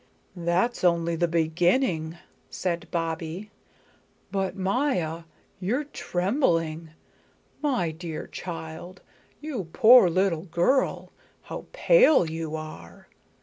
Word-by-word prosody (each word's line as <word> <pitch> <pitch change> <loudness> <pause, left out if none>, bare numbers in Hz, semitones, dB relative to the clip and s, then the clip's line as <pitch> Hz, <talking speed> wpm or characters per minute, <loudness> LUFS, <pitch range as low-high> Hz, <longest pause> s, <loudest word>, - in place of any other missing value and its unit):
"That's 180 +8 0
only 170 -1 +2
the 170 +1 +1
beginning," 170 +1 +1 0.3
said 170 - -3
Bobbie. 165 +4 -4 0.8
"But 195 -2 -1
Maya, 190 - -1 0.3
you're 225 +10 -1
trembling. 175 - -1 0.7
My 250 - 0
dear 160 -1 -6
child, 165 +1 -8 0.4
you 280 - -4
poor 240 -5 +7
little 180 -1 0
girl, 185 - +1 0.3
how - - -7
pale 400 - +5
you 160 0 -4
are! 155 - -10
175 Hz, 95 wpm, -26 LUFS, 165-200 Hz, 0.8 s, poor